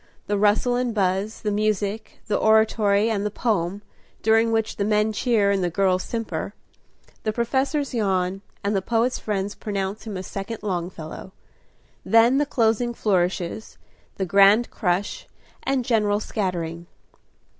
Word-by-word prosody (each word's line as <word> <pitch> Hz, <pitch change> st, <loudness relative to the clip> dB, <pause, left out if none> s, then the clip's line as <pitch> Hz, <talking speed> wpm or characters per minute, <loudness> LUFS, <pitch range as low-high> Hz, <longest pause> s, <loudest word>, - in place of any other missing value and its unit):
The 205 Hz, -, -1 dB
rustle 215 Hz, +4 st, +3 dB
and 245 Hz, -2 st, -1 dB
buzz, 195 Hz, +2 st, 0 dB
the 210 Hz, -, -1 dB
music, 210 Hz, 0 st, -1 dB
the 210 Hz, -, -1 dB
oratory 220 Hz, -1 st, +3 dB
and 205 Hz, -2 st, -1 dB
the 210 Hz, -, 0 dB
poem, 205 Hz, -3 st, -1 dB, 0.4 s
during 225 Hz, +1 st, +4 dB
which 225 Hz, -1 st, -1 dB
the 200 Hz, -, 0 dB
men 210 Hz, +1 st, +1 dB
cheer 215 Hz, -3 st, +2 dB
and 195 Hz, -2 st, +1 dB
the 175 Hz, -, +1 dB
girls 185 Hz, +1 st, +1 dB
simper; 205 Hz, -4 st, -4 dB, 0.7 s
the 215 Hz, -, -1 dB
professors 265 Hz, +5 st, -1 dB
yawn, 195 Hz, -4 st, 0 dB, 0.2 s
and 200 Hz, +1 st, 0 dB
the 195 Hz, -, +1 dB
poet's 235 Hz, +5 st, 0 dB
friends 205 Hz, -1 st, -2 dB
pronounce 200 Hz, 0 st, -4 dB
him 205 Hz, -3 st, -4 dB
a 185 Hz, -, -5 dB
second 200 Hz, +4 st, -6 dB
Longfellow. 175 Hz, -2 st, -5 dB, 0.7 s
Then 230 Hz, +4 st, +4 dB
the 295 Hz, -, +1 dB
closing 235 Hz, -1 st, +1 dB
flourishes, 185 Hz, 0 st, -1 dB, 0.4 s
the 190 Hz, -, -2 dB
grand 200 Hz, +5 st, +5 dB
crush, 185 Hz, -1 st, -2 dB, 0.3 s
and 265 Hz, -2 st, -1 dB
general 210 Hz, -3 st, +2 dB
scattering. 170 Hz, -6 st, -3 dB
210 Hz, 145 wpm, -23 LUFS, 195-225 Hz, 0.7 s, grand